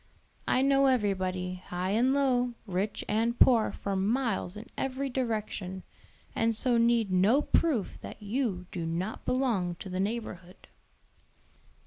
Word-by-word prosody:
I 255 Hz, -, +3 dB
know 275 Hz, 0 st, +4 dB
everybody, 185 Hz, -6 st, 0 dB
high 180 Hz, +2 st, -2 dB
and 240 Hz, +5 st, +3 dB
low, 250 Hz, -3 st, +1 dB
rich 195 Hz, +1 st, -2 dB
and 230 Hz, +3 st, 0 dB
poor, 235 Hz, -4 st, +5 dB
for 200 Hz, -1 st, -4 dB
miles 215 Hz, -1 st, 0 dB
in 215 Hz, -, -8 dB
every 270 Hz, +1 st, -2 dB
direction, 215 Hz, -7 st, -3 dB, 0.5 s
and 225 Hz, 0 st, +1 dB
so 240 Hz, +1 st, +2 dB
need 230 Hz, -3 st, +3 dB
no 205 Hz, +10 st, +4 dB
proof 280 Hz, -, 0 dB
that -, -, -9 dB
you 210 Hz, -4 st, -2 dB
do 170 Hz, -3 st, -4 dB
not 180 Hz, +6 st, -3 dB
belong 225 Hz, -10 st, 0 dB
to 190 Hz, -, -9 dB
the 185 Hz, 0 st, -3 dB
neighborhood." 195 Hz, -3 st, -5 dB
220 Hz, 135 wpm, -29 LUFS, 185-250 Hz, 0.5 s, poor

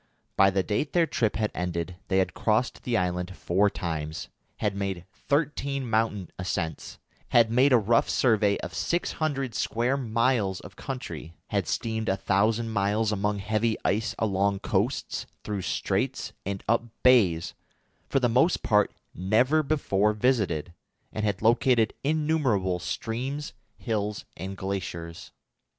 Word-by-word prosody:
By 95 Hz, 0 st, +6 dB
the 95 Hz, 0 st, +1 dB
date 110 Hz, +9 st, -1 dB
their 175 Hz, -2 st, +4 dB
trip 115 Hz, -8 st, 0 dB
had 105 Hz, 0 st, 0 dB
ended 90 Hz, 0 st, -3 dB
they 95 Hz, -, +1 dB
had 95 Hz, -, +1 dB
crossed 110 Hz, +2 st, 0 dB
the 120 Hz, -2 st, 0 dB
island 90 Hz, 0 st, -1 dB
four 100 Hz, +4 st, +2 dB
times, 80 Hz, -4 st, -4 dB, 0.3 s
had 105 Hz, -2 st, -1 dB
made 95 Hz, -3 st, -3 dB
thirteen 140 Hz, -2 st, -1 dB
mountain 110 Hz, -5 st, 0 dB
ascents, 85 Hz, -3 st, -3 dB, 0.3 s
had 115 Hz, -2 st, +5 dB
made 130 Hz, +4 st, +4 dB
a 125 Hz, -, +7 dB
rough 115 Hz, +1 st, +2 dB
survey 105 Hz, -5 st, +3 dB
of -, -, -6 dB
six 175 Hz, +1 st, -1 dB
hundred 135 Hz, -6 st, -2 dB
square 120 Hz, +4 st, 0 dB
miles 115 Hz, -5 st, +1 dB
of -, -, -12 dB
country, 85 Hz, -, -6 dB
had -, -, 0 dB
steamed 110 Hz, -1 st, -1 dB
a 95 Hz, -, +1 dB
thousand 110 Hz, +4 st, +1 dB
miles 105 Hz, +1 st, +1 dB
among 105 Hz, 0 st, 0 dB
heavy 110 Hz, +3 st, 0 dB
ice 110 Hz, +3 st, 0 dB
along 100 Hz, -2 st, +1 dB
coasts, -, -, -1 dB, 0.2 s
through 105 Hz, -2 st, -3 dB
straits, -, -, -1 dB
and 100 Hz, -1 st, -3 dB
up 115 Hz, +2 st, +3 dB, 0.2 s
bays, 100 Hz, -11 st, +4 dB, 0.6 s
for -, -, +2 dB
the 125 Hz, -, +3 dB
most 130 Hz, +9 st, +3 dB
part 105 Hz, -1 st, +3 dB, 0.2 s
never 120 Hz, -, +3 dB
before 105 Hz, -9 st, +1 dB
visited, 105 Hz, -, 0 dB, 0.4 s
and 110 Hz, -, -2 dB
had 105 Hz, 0 st, -1 dB
located 115 Hz, -1 st, +4 dB
innumerable 140 Hz, -, +1 dB
streams, 130 Hz, -, -4 dB, 0.2 s
hills, 105 Hz, -3 st, -2 dB
and 95 Hz, +3 st, -6 dB
glaciers. 85 Hz, -4 st, -5 dB
105 Hz, 140 wpm, -27 LUFS, 95-125 Hz, 0.6 s, a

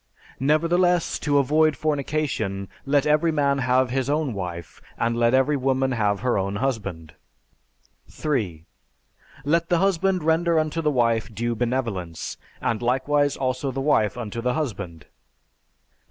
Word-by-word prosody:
Nevertheless, 170 Hz, +5 st, +2 dB
to 145 Hz, -2 st, +1 dB
avoid 150 Hz, +1 st, +3 dB
fornication, 140 Hz, -10 st, -2 dB, 0.2 s
let 145 Hz, 0 st, +3 dB
every 155 Hz, +2 st, +3 dB
man 140 Hz, -2 st, +1 dB
have 125 Hz, 0 st, +2 dB
his 135 Hz, 0 st, -1 dB
own 150 Hz, -3 st, 0 dB
wife, 90 Hz, -4 st, -6 dB, 0.2 s
and 115 Hz, 0 st, 0 dB
let 120 Hz, +1 st, +3 dB
every 135 Hz, +3 st, +3 dB
woman 135 Hz, 0 st, +1 dB
have 105 Hz, -4 st, 0 dB
her 125 Hz, -4 st, +1 dB
own 100 Hz, +1 st, -2 dB
husband. 100 Hz, -10 st, -3 dB, 1.0 s
3. 100 Hz, -, -2 dB, 0.8 s
Let 170 Hz, +3 st, +1 dB
the 175 Hz, -, +3 dB
husband 190 Hz, -1 st, +1 dB
render 165 Hz, +1 st, +2 dB
unto 155 Hz, +1 st, 0 dB
the 155 Hz, -, +1 dB
wife 115 Hz, -5 st, +1 dB
due 120 Hz, +2 st, -2 dB
benevolence; 115 Hz, -9 st, -3 dB, 0.2 s
and 115 Hz, 0 st, -1 dB
likewise 140 Hz, +4 st, +1 dB
also 130 Hz, +1 st, -1 dB
the 135 Hz, +1 st, -4 dB
wife 125 Hz, -5 st, +2 dB
unto 115 Hz, -1 st, -5 dB
the 125 Hz, +1 st, 0 dB
husband. 100 Hz, -, -4 dB
4. -, -, -32 dB
130 Hz, 140 wpm, -24 LUFS, 115-150 Hz, 1.0 s, avoid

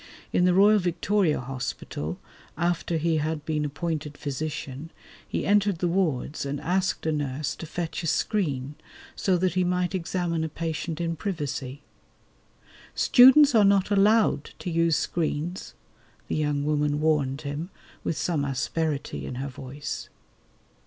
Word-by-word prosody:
In 180 Hz, -, +4 dB
the 180 Hz, -, +4 dB
Royal 205 Hz, +2 st, +6 dB
Victoria 180 Hz, 0 st, +1 dB
Hospital, 125 Hz, -, -5 dB, 0.4 s
after 170 Hz, 0 st, 0 dB
he 160 Hz, 0 st, +1 dB
had 155 Hz, 0 st, -2 dB
been 155 Hz, -1 st, -1 dB
appointed 150 Hz, -1 st, -4 dB
physician, 145 Hz, 0 st, -5 dB, 0.4 s
he -, -, -2 dB
entered 205 Hz, -2 st, +3 dB
the 175 Hz, -, 0 dB
wards 160 Hz, -6 st, 0 dB
and 140 Hz, 0 st, -3 dB
asked 185 Hz, +1 st, 0 dB
a 160 Hz, -, +2 dB
nurse 145 Hz, 0 st, -2 dB
to 165 Hz, -, -7 dB
fetch 165 Hz, +1 st, -4 dB
a 165 Hz, -, -3 dB
screen 145 Hz, -, 0 dB, 0.4 s
so 190 Hz, -3 st, +1 dB
that 185 Hz, +1 st, +1 dB
he 185 Hz, 0 st, +2 dB
might 180 Hz, +1 st, 0 dB
examine 175 Hz, -2 st, -1 dB
a 160 Hz, -, -2 dB
patient 160 Hz, +1 st, -4 dB
in 165 Hz, -1 st, -1 dB
privacy. 145 Hz, -6 st, -4 dB, 1.1 s
"Students 265 Hz, +3 st, +7 dB
are 220 Hz, -3 st, +6 dB
not 200 Hz, 0 st, +3 dB
allowed 205 Hz, -5 st, +4 dB
to 180 Hz, -, -5 dB
use 165 Hz, -1 st, +3 dB
screens," 170 Hz, +2 st, -2 dB, 0.5 s
the -, -, -2 dB
young 145 Hz, -2 st, 0 dB
woman 150 Hz, -1 st, +1 dB
warned 150 Hz, -3 st, +1 dB
him 150 Hz, +4 st, -4 dB, 0.3 s
with 165 Hz, -, -2 dB
some 160 Hz, -5 st, 0 dB
asperity 145 Hz, +2 st, -2 dB
in -, -, -5 dB
her 135 Hz, +2 st, -4 dB
voice. 135 Hz, +2 st, -6 dB
160 Hz, 145 wpm, -26 LUFS, 145-180 Hz, 1.1 s, Students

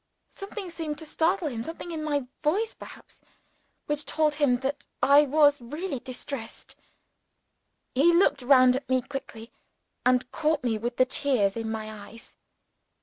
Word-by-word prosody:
Something 395 Hz, -2 st, -7 dB
seemed 315 Hz, -3 st, -4 dB
to 320 Hz, -, -4 dB
startle 330 Hz, +3 st, 0 dB
him 230 Hz, -5 st, -4 dB
something 330 Hz, +4 st, -7 dB
in 315 Hz, -2 st, -4 dB
my 290 Hz, -3 st, -1 dB, 0.2 s
voice 410 Hz, +9 st, 0 dB
perhaps -, -, -13 dB, 0.6 s
which 295 Hz, 0 st, -2 dB
told 305 Hz, 0 st, +1 dB
him 280 Hz, -5 st, +2 dB
that 280 Hz, +2 st, -3 dB, 0.2 s
I 285 Hz, +1 st, +6 dB
was 290 Hz, -1 st, +4 dB
really 295 Hz, +4 st, -4 dB
distressed. 255 Hz, -1 st, -6 dB, 1.2 s
He 290 Hz, +7 st, +5 dB
looked 345 Hz, -4 st, +3 dB
round 255 Hz, -1 st, +6 dB
at 260 Hz, 0 st, -5 dB
me 255 Hz, -1 st, +2 dB
quickly, 235 Hz, -5 st, -8 dB, 0.5 s
and 250 Hz, 0 st, +2 dB
caught 310 Hz, -3 st, 0 dB
me 225 Hz, -3 st, 0 dB
with 240 Hz, +2 st, -4 dB
the 255 Hz, -, +5 dB
tears 255 Hz, -7 st, +1 dB
in 225 Hz, -1 st, -3 dB
my 220 Hz, -1 st, -4 dB, 0.2 s
eyes. 230 Hz, +2 st, -12 dB
280 Hz, 150 wpm, -27 LUFS, 250-310 Hz, 1.2 s, I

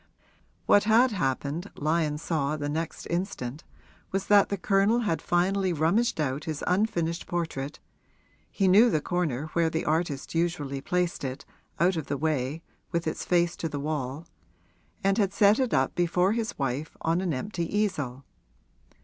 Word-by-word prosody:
What 205 Hz, -, +5 dB
had 235 Hz, +4 st, +5 dB
happened, 150 Hz, +1 st, -2 dB
Lyon 155 Hz, 0 st, 0 dB
saw 150 Hz, -2 st, -1 dB
the 145 Hz, -1 st, -3 dB
next 160 Hz, +2 st, -4 dB
instant, 170 Hz, -6 st, -3 dB, 0.5 s
was 195 Hz, 0 st, -1 dB
that 205 Hz, -1 st, +6 dB
the 200 Hz, -, -1 dB
Colonel 200 Hz, +5 st, +2 dB
had 170 Hz, -8 st, -1 dB
finally 185 Hz, +1 st, +1 dB
rummaged 170 Hz, +8 st, +1 dB
out 140 Hz, -1 st, -1 dB
his 155 Hz, -3 st, -4 dB
unfinished 175 Hz, -4 st, 0 dB
portrait 160 Hz, -5 st, -3 dB, 0.7 s
(he 195 Hz, -, +1 dB
knew 210 Hz, +6 st, +7 dB
the 155 Hz, -, +2 dB
corner 155 Hz, -3 st, -2 dB
where 165 Hz, -1 st, +2 dB
the 160 Hz, 0 st, -2 dB
artist 155 Hz, -3 st, -1 dB
usually 165 Hz, -5 st, -1 dB
placed 180 Hz, +1 st, -1 dB
it, 135 Hz, +1 st, -5 dB, 0.3 s
out 175 Hz, +1 st, +3 dB
of 160 Hz, -, -4 dB
the 140 Hz, -, -2 dB
way, 150 Hz, 0 st, -1 dB, 0.3 s
with 170 Hz, -1 st, -1 dB
its 160 Hz, -, -2 dB
face 175 Hz, -1 st, +2 dB
to 165 Hz, -, -3 dB
the 145 Hz, -, -4 dB
wall) 145 Hz, 0 st, -3 dB, 0.8 s
and 195 Hz, +2 st, +2 dB
had 195 Hz, -2 st, +1 dB
set 210 Hz, +1 st, +5 dB
it 255 Hz, -3 st, +1 dB
up 130 Hz, 0 st, +2 dB
before 180 Hz, +2 st, +2 dB
his 230 Hz, 0 st, -3 dB
wife 140 Hz, +2 st, -3 dB
on 165 Hz, +2 st, +1 dB
an 185 Hz, -3 st, -1 dB
empty 170 Hz, +5 st, -3 dB
easel. 150 Hz, -12 st, -1 dB
170 Hz, 160 wpm, -27 LUFS, 150-190 Hz, 0.8 s, knew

